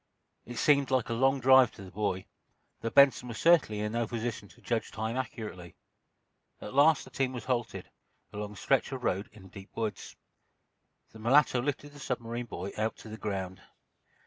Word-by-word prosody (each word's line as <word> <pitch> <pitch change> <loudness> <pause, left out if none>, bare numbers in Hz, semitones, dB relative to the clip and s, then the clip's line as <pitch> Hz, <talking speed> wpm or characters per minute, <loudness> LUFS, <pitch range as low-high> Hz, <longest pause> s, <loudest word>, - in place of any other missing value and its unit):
It 120 0 -7
seemed 140 -2 +3
like 130 -3 +1
a - - 0
long 135 +3 +2
drive 130 -1 +7
to 100 - -11
the 95 - -11
boy, 100 -2 -2 0.6
though 115 - -2
Benson 135 -1 +5
was 115 -3 -6
certainly 155 -11 +4
in 105 0 -2
no 115 0 -1
position 115 -2 -4
to - - -20
judge 115 -2 -2
time 110 +3 -3
accurately. 105 -9 -6 0.8
At - - -8
last 145 0 +5
the - - -14
team 130 -1 -1
was 120 -3 -6
halted, 125 -3 -2 0.5
along 105 0 -5
a - - -13
stretch 135 +7 +1
of 130 -2 -5
road 95 0 -1
in 105 -3 -15
a - - -12
deep 95 +2 -12
woods. 110 -3 -4 1.0
The 110 - -13
mulatto 125 +2 +4
lifted 145 +2 -3
the 145 - -14
submarine 120 -2 -4
boy 95 -2 -5
out 110 +1 -1
to 110 - -11
the 110 - -7
ground. 95 -4 -4
115 Hz, 190 wpm, -30 LUFS, 105-130 Hz, 1.0 s, drive